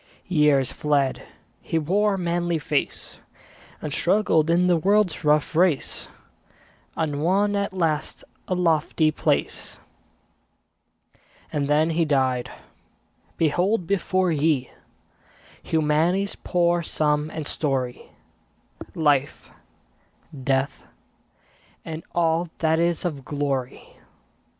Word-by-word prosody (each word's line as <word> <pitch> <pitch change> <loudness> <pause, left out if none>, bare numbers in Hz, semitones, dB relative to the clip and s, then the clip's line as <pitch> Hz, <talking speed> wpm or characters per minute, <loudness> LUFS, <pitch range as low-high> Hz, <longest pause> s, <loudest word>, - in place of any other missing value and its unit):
Years 150 -7 +3
fled; 145 -3 0 0.4
he 165 - -2
wore 195 +6 +1
a - - -4
manly 175 -1 -1
face, 150 -1 -3 0.6
And 150 -2 -3
struggled 170 -4 +2
in 175 +2 +3
the 180 -1 +4
world's 200 +1 +2
rough 150 +1 +2
race, 170 -4 +1 0.9
And 150 -3 -1
won 200 +5 +2
at 200 0 -1
last 165 -5 -2 0.2
a 185 - 0
lofty 160 -2 +2
place. - - -1 1.8
And 145 -2 0
then 155 +3 +2
he 165 +1 +1
died! 130 -5 0 0.9
Behold 175 +5 +1
before 185 -1 +1
ye 150 -4 +1 0.9
Humanity's 160 +5 +1
poor 175 -1 +1
sum 150 -2 0
and 160 -1 -6
story; 130 -5 -2 0.9
Life, 145 -3 0 0.9
Death, 135 +1 0 1.0
and 160 -1 -5
all 170 0 +1
that 160 0 +1
is 170 0 0
of 145 -6 -3
glory. 140 -3 -4
160 Hz, 100 wpm, -24 LUFS, 150-175 Hz, 1.8 s, the